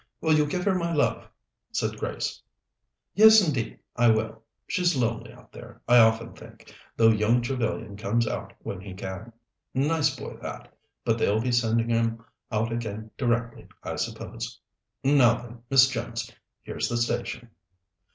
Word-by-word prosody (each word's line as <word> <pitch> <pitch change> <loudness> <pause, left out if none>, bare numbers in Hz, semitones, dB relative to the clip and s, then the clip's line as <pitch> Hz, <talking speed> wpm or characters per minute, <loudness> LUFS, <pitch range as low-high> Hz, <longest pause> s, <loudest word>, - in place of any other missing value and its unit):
Will 160 - +2
you 150 -1 +3
give 180 +4 -2
her 200 - +3
my 170 -2 -1
love?" 150 -3 0 0.4
said - - -2
Grace. - - -3 0.7
"Yes, 220 +1 +8
indeed 125 -7 -2 0.2
I 120 0 +4
will. 110 0 0 0.2
She's 180 -4 +1
lonely 115 -2 -1
out - - -18
there, - - -12
I 120 0 +7
often 115 0 +3
think, - - -15 0.2
though 115 -1 +6
young 110 +3 +3
Trevellyan 120 -5 -3
comes 115 +3 0
out - - -4
when 95 - -5
he 95 -1 -9
can. 95 +4 -7 0.4
Nice 145 +1 +2
boy - - -7
that, - - -8 0.3
but 115 0 +1
they'll 105 0 +2
be 125 +2 -1
sending 115 -1 +1
him 115 -1 0 0.3
out 110 +1 0
again 110 -2 -5
directly, 115 -2 -1 0.2
I - - -4
suppose. - - -5 0.4
Now, 130 -4 +5
then, 120 0 -12
Miss 135 -1 +7
Jones, 115 -3 -4 0.3
here's - - -3
the 120 - -1
station." 120 0 -2
120 Hz, 155 wpm, -26 LUFS, 110-130 Hz, 0.7 s, Yes